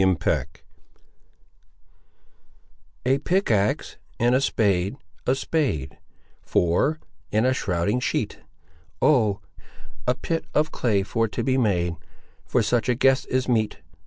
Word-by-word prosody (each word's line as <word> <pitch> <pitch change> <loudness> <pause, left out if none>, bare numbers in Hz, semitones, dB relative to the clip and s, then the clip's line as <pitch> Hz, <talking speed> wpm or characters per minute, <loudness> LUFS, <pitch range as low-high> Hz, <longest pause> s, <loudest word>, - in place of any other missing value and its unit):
CHAPTER 95 -3 +2
XIII 65 - 0 2.6
A 130 +2 +3
pickaxe, 120 - +1 0.2
and 120 +1 +3
a 130 - +3
spade, 100 -5 +1 0.3
a 130 - +3
spade, 135 - -2 0.4
For,—and 110 - 0
a 130 - +3
shrouding 100 0 0
sheet: 125 - -2 0.6
O, 110 -9 +3 0.7
a 125 - +3
pit 165 +4 -3
of 155 +1 +2
clay 105 -5 +1
for 115 +3 0
to 115 +2 -3
be 130 +2 +1
made 90 -7 +1 0.5
For 125 - +2
such 120 +3 +1
a 125 - +3
guest 135 +2 +3
is 130 0 0
meet. 110 -4 +1
115 Hz, 120 wpm, -24 LUFS, 100-130 Hz, 2.6 s, A